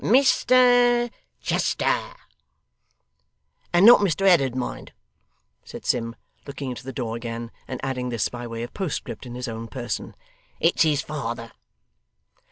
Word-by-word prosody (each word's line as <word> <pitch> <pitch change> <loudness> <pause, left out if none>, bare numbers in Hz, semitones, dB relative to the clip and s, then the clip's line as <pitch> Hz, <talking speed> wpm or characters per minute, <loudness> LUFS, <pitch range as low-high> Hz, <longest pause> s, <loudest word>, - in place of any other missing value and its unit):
'Mr 245 -1 +4 0.3
Chester.' - - 0 1.6
'And 175 +3 +5
not 240 +2 +10
Mr 195 -1 0
Ed'dard, 140 -9 +4
mind,' 130 - -5 0.7
said - - -10
Sim, 115 -1 0 0.3
looking 140 -1 -5
into 125 - -7
the 135 - -6
door 120 -3 -4
again, 115 0 -6 0.2
and 130 - -5
adding 125 -2 -2
this 115 -4 0
by 120 0 -7
way 115 0 -5
of 120 - -8
postscript 180 -8 -4
in 120 - -8
his 125 +1 -4
own 115 0 -5
person; 120 +1 -5 0.4
'it's 170 - +2
his 150 -3 +3
father. 120 -6 -5
130 Hz, 135 wpm, -24 LUFS, 120-190 Hz, 1.6 s, not